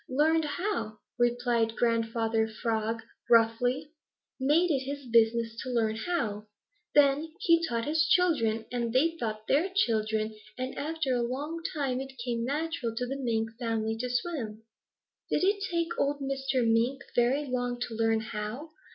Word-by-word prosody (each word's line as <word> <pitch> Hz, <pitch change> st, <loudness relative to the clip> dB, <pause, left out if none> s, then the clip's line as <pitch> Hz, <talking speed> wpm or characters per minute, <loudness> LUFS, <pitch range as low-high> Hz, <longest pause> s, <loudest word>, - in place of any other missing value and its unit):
"Learned 310 Hz, +4 st, +3 dB
how," 350 Hz, -, -2 dB, 0.2 s
replied 240 Hz, -2 st, +2 dB
Grandfather 225 Hz, -1 st, +1 dB
Frog 225 Hz, 0 st, -2 dB, 0.3 s
gruffly. 245 Hz, +5 st, +3 dB, 0.5 s
"Made 310 Hz, +6 st, +3 dB
it 275 Hz, -, +2 dB
his 280 Hz, +1 st, -5 dB
business 230 Hz, -1 st, +3 dB
to 260 Hz, -, -5 dB
learn 225 Hz, -3 st, +1 dB
how. 220 Hz, -6 st, -2 dB, 0.5 s
Then 290 Hz, +2 st, +4 dB
he 335 Hz, -1 st, +4 dB
taught 230 Hz, -1 st, -1 dB
his 315 Hz, +1 st, +2 dB
children, 230 Hz, -13 st, +2 dB
and 240 Hz, -2 st, -1 dB
they 325 Hz, +6 st, +3 dB
taught 215 Hz, -7 st, -4 dB
their 325 Hz, +8 st, +2 dB
children, 220 Hz, -, +1 dB, 0.2 s
and 255 Hz, +1 st, -4 dB
after 305 Hz, -3 st, -1 dB
a 245 Hz, -, +1 dB
long 285 Hz, +7 st, -3 dB
time 265 Hz, -4 st, -1 dB
it 270 Hz, 0 st, -8 dB
came 235 Hz, -2 st, -1 dB
natural 285 Hz, -3 st, -2 dB
to 250 Hz, -, -1 dB
the 265 Hz, +2 st, -3 dB
Mink 225 Hz, -4 st, -1 dB
family 225 Hz, -2 st, -1 dB
to 250 Hz, +1 st, -2 dB
swim." 245 Hz, -5 st, -3 dB, 0.7 s
"Did -, -, +1 dB
it 400 Hz, +2 st, +2 dB
take 335 Hz, -1 st, 0 dB
old 285 Hz, +1 st, +1 dB
Mr. 270 Hz, -2 st, 0 dB
Mink 235 Hz, +4 st, +2 dB
very 255 Hz, +5 st, +2 dB
long 245 Hz, -2 st, -2 dB
to 245 Hz, -, -3 dB
learn 225 Hz, 0 st, +2 dB
how?" 220 Hz, +8 st, -5 dB
245 Hz, 150 wpm, -29 LUFS, 225-290 Hz, 0.7 s, Then